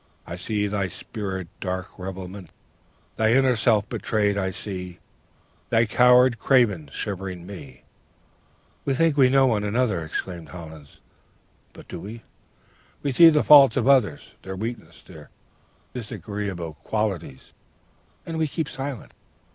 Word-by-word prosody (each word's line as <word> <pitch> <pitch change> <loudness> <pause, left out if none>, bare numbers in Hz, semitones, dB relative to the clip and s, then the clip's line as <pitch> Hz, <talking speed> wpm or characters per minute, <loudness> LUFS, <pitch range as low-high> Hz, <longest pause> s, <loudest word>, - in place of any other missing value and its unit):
I 85 - -6
see 105 +3 -2
thy 100 -2 -1
spirit's 95 -3 -6
dark 95 0 -5
revealment! 95 0 -7 0.7
Thy 110 0 +3
inner 130 -1 +4
self 110 -2 +2
betrayed 105 -2 0
I 95 -2 -1
see: 90 -2 -6 0.7
Thy 115 0 +3
coward, 125 +1 +5
craven, 105 - +2
shivering 95 -2 -5
ME' 70 -10 -11 1.0
"'We 135 - 0
think 165 +1 +2
we 135 -3 +5
know 135 0 +4
one 110 -5 +1
another,' 105 -5 0
exclaimed 85 +2 -6
Hollins; 80 -4 -12 0.7
'but - - -14
do - - -7
we? 110 +6 -9 0.8
We 140 - 0
see 165 +6 +8
the 150 -2 +2
faults 140 -2 +8
of 125 -1 +1
others, 125 - +2
their 95 0 -7
weaknesses, 115 +5 -7
their - - -14 0.6
disagreeable 100 -7 -5
qualities, 95 -11 -3 0.7
and 165 -1 -4
we 160 - +1
keep 155 +1 -3
silent. 135 -3 -6
105 Hz, 130 wpm, -24 LUFS, 95-125 Hz, 1.0 s, see